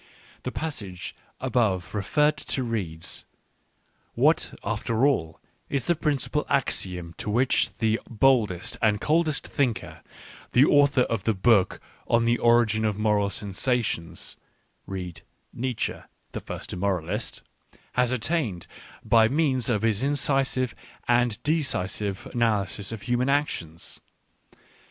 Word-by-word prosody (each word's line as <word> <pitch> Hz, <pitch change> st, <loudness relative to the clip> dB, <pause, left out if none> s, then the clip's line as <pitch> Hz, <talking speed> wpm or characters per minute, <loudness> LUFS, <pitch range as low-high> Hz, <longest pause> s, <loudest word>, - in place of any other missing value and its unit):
— -, -, -25 dB
The -, -, -2 dB
passage 105 Hz, -, -5 dB, 0.2 s
above 115 Hz, -8 st, 0 dB
referred 150 Hz, +9 st, +2 dB
to 140 Hz, -2 st, -1 dB
reads: 95 Hz, -9 st, -3 dB, 0.5 s
" -, -, -42 dB
What, -, -, +4 dB
after 115 Hz, +3 st, 0 dB
all, 80 Hz, -, 0 dB, 0.3 s
is 135 Hz, -4 st, 0 dB
the 175 Hz, -, +2 dB
principal 150 Hz, -1 st, 0 dB
axiom 90 Hz, -10 st, -1 dB
to -, -, -3 dB
which 125 Hz, +5 st, +2 dB
the 110 Hz, -1 st, +1 dB
boldest 110 Hz, -6 st, +2 dB
and 105 Hz, -3 st, +3 dB
coldest 155 Hz, +1 st, +1 dB
thinker, 95 Hz, -, -2 dB, 0.5 s
the 130 Hz, +3 st, +7 dB
author 145 Hz, -3 st, +4 dB
of 110 Hz, -5 st, -2 dB
the 110 Hz, -, +2 dB
book 100 Hz, 0 st, +3 dB, 0.3 s
On 115 Hz, 0 st, +3 dB
the 120 Hz, 0 st, +2 dB
Origin 115 Hz, -2 st, +4 dB
of 105 Hz, -2 st, 0 dB
Moral 105 Hz, -2 st, +2 dB
Sensations 100 Hz, -4 st, -2 dB, 0.2 s
" -, -, -43 dB
(read 90 Hz, -4 st, -6 dB, 0.3 s
Nietzsche, 125 Hz, -1 st, -2 dB, 0.3 s
the -, -, -4 dB
first -, -, -7 dB
Immoralist), 90 Hz, -3 st, -2 dB, 0.3 s
" -, -, -29 dB
has 125 Hz, 0 st, +2 dB
attained 125 Hz, -, -1 dB, 0.4 s
by 115 Hz, -1 st, +5 dB
means 130 Hz, -3 st, +1 dB
of 110 Hz, -3 st, +1 dB
his 110 Hz, -2 st, +2 dB
incisive 135 Hz, -3 st, +1 dB, 0.3 s
and 120 Hz, -2 st, +3 dB
decisive 105 Hz, -, -1 dB
analysis 105 Hz, -4 st, 0 dB
of 110 Hz, -3 st, -6 dB
human 125 Hz, +2 st, +1 dB
actions 90 Hz, -, -2 dB
115 Hz, 130 wpm, -26 LUFS, 100-130 Hz, 0.5 s, the